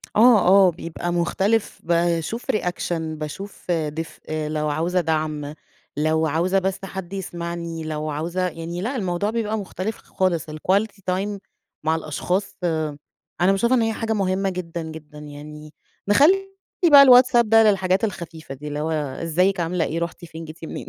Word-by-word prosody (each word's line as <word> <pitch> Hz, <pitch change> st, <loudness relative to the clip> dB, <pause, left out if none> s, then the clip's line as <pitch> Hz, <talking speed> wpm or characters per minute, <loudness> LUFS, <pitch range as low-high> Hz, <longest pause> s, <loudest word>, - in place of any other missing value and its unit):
آه، 230 Hz, 0 st, +7 dB
آه 190 Hz, 0 st, +7 dB
بيبقى 170 Hz, +1 st, -5 dB
مختلف 195 Hz, +5 st, 0 dB
باشوف 170 Hz, +5 st, 0 dB
reaction 180 Hz, -3 st, -2 dB
باشوف 160 Hz, +5 st, -6 dB
دفئ، 155 Hz, -1 st, -3 dB
لو 150 Hz, 0 st, -1 dB
عاوزة 170 Hz, +5 st, 0 dB
دعم، 155 Hz, -2 st, -2 dB, 0.4 s
لو 160 Hz, +1 st, +2 dB
عاوزة 175 Hz, +5 st, +1 dB
بس 190 Hz, 0 st, -2 dB
حد 190 Hz, -1 st, -7 dB
يسمعني، 170 Hz, -3 st, -5 dB
لو 155 Hz, 0 st, -3 dB
عاوزة 170 Hz, +5 st, -1 dB
يعني 170 Hz, +1 st, -5 dB
لأ، 240 Hz, +8 st, -2 dB
الموضوع 190 Hz, -3 st, -1 dB
بيبقى 220 Hz, -1 st, -1 dB
مُختلف 200 Hz, +1 st, -4 dB
خ -, -, -23 dB
خالص 175 Hz, -5 st, 0 dB
الquality 195 Hz, +8 st, 0 dB
time 200 Hz, +2 st, -2 dB, 0.4 s
مع 160 Hz, +1 st, +2 dB
الأشخاص 180 Hz, +5 st, -2 dB, 0.9 s
أنا 180 Hz, +2 st, +5 dB
باشوفها 235 Hz, +6 st, +2 dB
إن -, -, +2 dB
هي 225 Hz, 0 st, +1 dB
حاجة 225 Hz, 0 st, -2 dB
مهمة 195 Hz, -1 st, 0 dB
جدًا، 175 Hz, -2 st, -5 dB
جدًا، 160 Hz, -1 st, -10 dB
يعني 150 Hz, +1 st, -10 dB, 0.3 s
نخلّي 355 Hz, -, +4 dB, 0.4 s
بقى 280 Hz, -1 st, +10 dB
الWhatsAPP 250 Hz, -1 st, +7 dB
ده 225 Hz, +1 st, +6 dB
للحاجات 190 Hz, -2 st, +2 dB
الخفيفة 170 Hz, -8 st, -5 dB
دي، 145 Hz, +3 st, -9 dB
اللي 145 Hz, 0 st, -3 dB
هو 155 Hz, +2 st, -2 dB
إزيك، 165 Hz, +6 st, 0 dB
عاملة 170 Hz, 0 st, 0 dB
إيه، 165 Hz, -, -2 dB
رُحتِ 170 Hz, +1 st, -5 dB
فين، 165 Hz, 0 st, -9 dB
جيتِ 160 Hz, +1 st, -9 dB
منين؟ -, -, -7 dB
175 Hz, 155 wpm, -23 LUFS, 160-195 Hz, 0.9 s, بقى